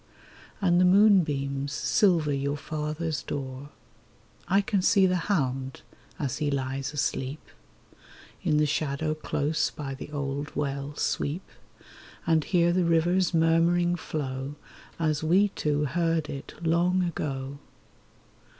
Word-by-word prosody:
And 175 Hz, -2 st, +4 dB
the -, -, +5 dB
moonbeams 150 Hz, -9 st, +3 dB
silver 160 Hz, -1 st, +2 dB
your 140 Hz, +1 st, -1 dB
father's 155 Hz, 0 st, -3 dB
door. 135 Hz, 0 st, -6 dB, 0.8 s
I 195 Hz, +3 st, +4 dB
can 200 Hz, -1 st, 0 dB
see 195 Hz, +1 st, +4 dB
the 185 Hz, 0 st, +2 dB
hound 135 Hz, -7 st, -1 dB, 0.3 s
as 140 Hz, -5 st, -3 dB
he 150 Hz, -, 0 dB
lies 135 Hz, 0 st, -2 dB
asleep. 140 Hz, -1 st, -2 dB, 1.0 s
In 150 Hz, -, +2 dB
the 150 Hz, -, +4 dB
shadow 155 Hz, +1 st, -1 dB
close 155 Hz, 0 st, -1 dB
by 140 Hz, -2 st, -6 dB
the 135 Hz, +2 st, -8 dB
old 145 Hz, 0 st, -4 dB
well 140 Hz, 0 st, -3 dB
sweep, 150 Hz, +5 st, -2 dB, 0.8 s
And 160 Hz, -2 st, +3 dB
hear 175 Hz, 0 st, +2 dB
the 180 Hz, 0 st, +2 dB
river's 170 Hz, +2 st, +2 dB
murmuring 170 Hz, +2 st, +3 dB
flow 140 Hz, -4 st, -4 dB, 0.4 s
As 155 Hz, -2 st, 0 dB
we 190 Hz, +6 st, +4 dB
two 150 Hz, -5 st, -1 dB
heard 165 Hz, +1 st, 0 dB
it 140 Hz, -, -8 dB
long 175 Hz, +3 st, +2 dB
ago. 140 Hz, -5 st, -4 dB
150 Hz, 125 wpm, -27 LUFS, 140-175 Hz, 1.0 s, the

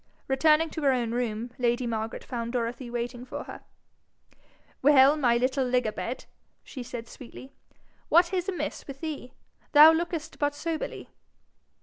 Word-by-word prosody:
Returning 305 Hz, +4 st, +3 dB
to 315 Hz, -, -5 dB
her 280 Hz, -2 st, +4 dB
own 240 Hz, -3 st, 0 dB
room, 235 Hz, -1 st, -2 dB
lady 240 Hz, 0 st, +1 dB
Margaret 225 Hz, -1 st, -3 dB
found 235 Hz, -1 st, -5 dB
Dorothy 245 Hz, +1 st, -3 dB
waiting 240 Hz, +1 st, -4 dB
for 250 Hz, -, -6 dB
her. -, -, -10 dB, 1.2 s
'Well, 280 Hz, 0 st, +6 dB
my 245 Hz, -6 st, +2 dB
little 260 Hz, +2 st, +1 dB
lig 250 Hz, -1 st, +1 dB
a 215 Hz, -, 0 dB
bed!' 240 Hz, +4 st, -5 dB, 0.4 s
she 260 Hz, -, -8 dB
said 235 Hz, -1 st, -7 dB
sweetly, 260 Hz, +2 st, -12 dB, 0.6 s
'what 345 Hz, +2 st, +4 dB
is 370 Hz, +1 st, -1 dB
amiss 370 Hz, -, -4 dB
with 275 Hz, -1 st, -9 dB
thee? 300 Hz, -6 st, -6 dB, 0.4 s
Thou 305 Hz, +2 st, +10 dB
lookest 330 Hz, -1 st, -3 dB
but 290 Hz, 0 st, 0 dB
soberly.' 315 Hz, +1 st, -4 dB
260 Hz, 150 wpm, -27 LUFS, 240-305 Hz, 1.2 s, Thou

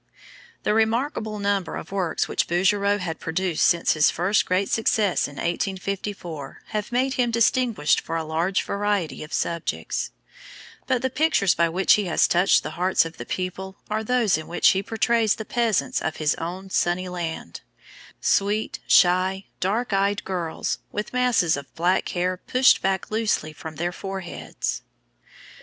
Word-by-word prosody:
The -, -, +1 dB
remarkable 220 Hz, 0 st, 0 dB
number 200 Hz, -3 st, -1 dB
of 160 Hz, -, -7 dB
works 185 Hz, -5 st, -1 dB
which -, -, 0 dB
Bouguereau 200 Hz, +3 st, +2 dB
has 175 Hz, -5 st, -4 dB
produced 170 Hz, 0 st, -1 dB
since 170 Hz, -1 st, +3 dB
his 155 Hz, -1 st, +4 dB
first 185 Hz, +5 st, +1 dB
great 185 Hz, +2 st, +1 dB
success 215 Hz, -3 st, +1 dB
in 145 Hz, -, -12 dB
1854 180 Hz, -3 st, -4 dB
have 210 Hz, +1 st, -3 dB
made 260 Hz, +2 st, +1 dB
him 250 Hz, -2 st, +1 dB
distinguished 230 Hz, -6 st, +2 dB
for 165 Hz, -, -5 dB
a 165 Hz, -, -1 dB
large 165 Hz, +5 st, 0 dB
variety 200 Hz, -6 st, -1 dB
of 155 Hz, -, -11 dB
subjects; 170 Hz, -1 st, -2 dB, 0.8 s
but 255 Hz, -2 st, 0 dB
the 260 Hz, -, 0 dB
pictures 265 Hz, -, +3 dB
by 170 Hz, 0 st, +2 dB
which 185 Hz, +4 st, +4 dB
he 210 Hz, -, +2 dB
has 175 Hz, -, +3 dB
touched 180 Hz, +3 st, +3 dB
the -, -, -5 dB
hearts 185 Hz, -2 st, +3 dB
of 165 Hz, 0 st, -8 dB
the 120 Hz, -, -8 dB
people 190 Hz, +1 st, -4 dB
are 220 Hz, +1 st, 0 dB
those 225 Hz, -7 st, +2 dB
in 160 Hz, -, -9 dB
which 175 Hz, -, +4 dB
he 190 Hz, -, +2 dB
portrays 225 Hz, +1 st, +1 dB
the 220 Hz, -, -7 dB
peasants 230 Hz, -5 st, 0 dB
of 160 Hz, 0 st, -2 dB
his 155 Hz, 0 st, +1 dB
own 185 Hz, +3 st, -6 dB
sunny 180 Hz, +1 st, +1 dB
land, 165 Hz, -, -5 dB, 0.6 s
sweet, 205 Hz, +2 st, +1 dB
shy, 185 Hz, +2 st, +4 dB
dark 215 Hz, +4 st, -1 dB
eyed 200 Hz, +1 st, +1 dB
girls, 175 Hz, -4 st, -3 dB
with 210 Hz, +3 st, -4 dB
masses 250 Hz, -10 st, +2 dB
of 140 Hz, -1 st, -8 dB
black 175 Hz, +3 st, +1 dB
hair 180 Hz, +1 st, -1 dB
pushed 255 Hz, +7 st, +3 dB
back 190 Hz, +1 st, -1 dB
loosely 215 Hz, -8 st, 0 dB
from 160 Hz, +1 st, -9 dB
their 175 Hz, +3 st, -2 dB
foreheads. 190 Hz, -1 st, -5 dB
190 Hz, 160 wpm, -24 LUFS, 170-215 Hz, 0.8 s, his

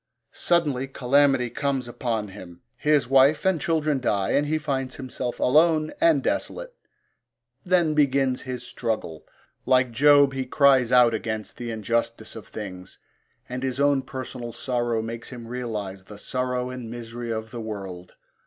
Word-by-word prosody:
Suddenly 145 Hz, -7 st, +1 dB
calamity 135 Hz, -1 st, +2 dB
comes 135 Hz, -3 st, -1 dB
upon 115 Hz, -3 st, -3 dB
him, 90 Hz, -3 st, -12 dB
his 145 Hz, -2 st, +2 dB
wife 135 Hz, +5 st, +4 dB
and 190 Hz, -5 st, +2 dB
children 155 Hz, -3 st, +1 dB
die 100 Hz, -6 st, 0 dB
and 145 Hz, +1 st, +2 dB
he 155 Hz, +1 st, +1 dB
finds 135 Hz, -4 st, -3 dB
himself 130 Hz, -2 st, -5 dB
alone 155 Hz, +3 st, +3 dB
and 330 Hz, -1 st, +4 dB
desolate. -, -, -2 dB, 0.9 s
Then 175 Hz, -4 st, +2 dB
begins 135 Hz, -3 st, +2 dB
his 125 Hz, -1 st, -5 dB
struggle. 110 Hz, -11 st, -4 dB, 0.4 s
Like 130 Hz, -1 st, +3 dB
Job, 145 Hz, +3 st, +5 dB
he 135 Hz, -1 st, -2 dB
cries 130 Hz, -3 st, +4 dB
out 125 Hz, -2 st, +6 dB
against 110 Hz, -1 st, -4 dB
the 120 Hz, -1 st, -5 dB
injustice 115 Hz, +1 st, -2 dB
of 110 Hz, -, -9 dB
things, 95 Hz, -3 st, -8 dB, 0.5 s
and 125 Hz, 0 st, -5 dB
his 130 Hz, 0 st, -2 dB
own 140 Hz, -1 st, +3 dB
personal 125 Hz, -3 st, -7 dB
sorrow 120 Hz, -2 st, -1 dB
makes 115 Hz, +1 st, -6 dB
him 120 Hz, -3 st, -9 dB
realise 110 Hz, -6 st, -5 dB
the 100 Hz, +2 st, -12 dB
sorrow 125 Hz, +2 st, -2 dB
and 125 Hz, -3 st, -7 dB
misery 120 Hz, 0 st, -7 dB
of 110 Hz, 0 st, -4 dB
the 120 Hz, -, -6 dB
world. 95 Hz, -5 st, -7 dB
125 Hz, 150 wpm, -25 LUFS, 115-140 Hz, 0.9 s, out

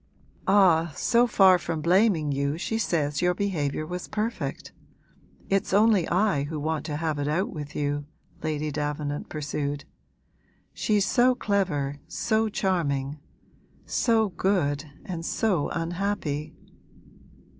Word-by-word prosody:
'Ah, 180 Hz, -5 st, +5 dB
so 240 Hz, +1 st, +3 dB
far 190 Hz, -5 st, +6 dB
from 165 Hz, 0 st, -3 dB
blaming 175 Hz, -2 st, +3 dB
you 140 Hz, +2 st, -1 dB
she 220 Hz, +6 st, -2 dB
says 150 Hz, -8 st, 0 dB
your 180 Hz, 0 st, +2 dB
behaviour 155 Hz, -7 st, -1 dB
was 180 Hz, +2 st, -5 dB
perfect. 215 Hz, +2 st, -3 dB, 0.8 s
It's 195 Hz, -1 st, +1 dB
only 210 Hz, -4 st, +4 dB
I 180 Hz, -6 st, +2 dB
who 155 Hz, +1 st, -4 dB
want 155 Hz, +1 st, -2 dB
to 150 Hz, -, -3 dB
have 155 Hz, -1 st, -2 dB
it 145 Hz, -, -1 dB
out 170 Hz, +7 st, 0 dB
with 145 Hz, -3 st, -7 dB
you,' 145 Hz, 0 st, -2 dB, 0.3 s
Lady 155 Hz, -1 st, -2 dB
Davenant 145 Hz, 0 st, -3 dB
pursued. 145 Hz, -1 st, -3 dB, 0.9 s
'She's 210 Hz, -2 st, +1 dB
so 250 Hz, +2 st, +4 dB
clever, 175 Hz, -, -1 dB
so 220 Hz, -1 st, 0 dB
charming, 150 Hz, -8 st, -1 dB, 0.7 s
so 225 Hz, -3 st, +2 dB
good 165 Hz, -6 st, 0 dB, 0.2 s
and 170 Hz, -3 st, -5 dB
so 180 Hz, -4 st, 0 dB
unhappy.' 165 Hz, -3 st, -2 dB
165 Hz, 125 wpm, -26 LUFS, 145-200 Hz, 0.9 s, far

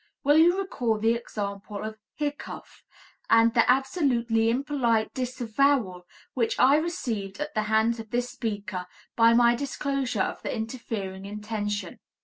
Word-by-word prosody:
Will 290 Hz, +2 st, +5 dB
you 350 Hz, +3 st, +5 dB
recall 245 Hz, -, -1 dB
the 225 Hz, +2 st, +2 dB
example 205 Hz, -3 st, -5 dB
of 215 Hz, 0 st, -6 dB, 0.2 s
"hiccough," 290 Hz, -1 st, -5 dB, 0.5 s
and 230 Hz, 0 st, +5 dB
the 230 Hz, -, +3 dB
absolutely 250 Hz, -5 st, +2 dB
impolite 240 Hz, -3 st, 0 dB
disavowal 245 Hz, -6 st, 0 dB, 0.3 s
which 235 Hz, -3 st, 0 dB
I 275 Hz, +3 st, +6 dB
received 230 Hz, -, -3 dB
at 300 Hz, 0 st, -4 dB
the 215 Hz, -, +1 dB
hands 220 Hz, +2 st, +2 dB
of 220 Hz, -1 st, -8 dB
this 245 Hz, +2 st, -1 dB
speaker 205 Hz, -5 st, -4 dB, 0.3 s
by 230 Hz, 0 st, +5 dB
my 240 Hz, 0 st, +5 dB
disclosure 275 Hz, -3 st, -1 dB
of -, -, -4 dB
the -, -, -3 dB
interfering 220 Hz, -4 st, -5 dB
intention. 210 Hz, 0 st, -4 dB
230 Hz, 135 wpm, -26 LUFS, 215-265 Hz, 0.5 s, I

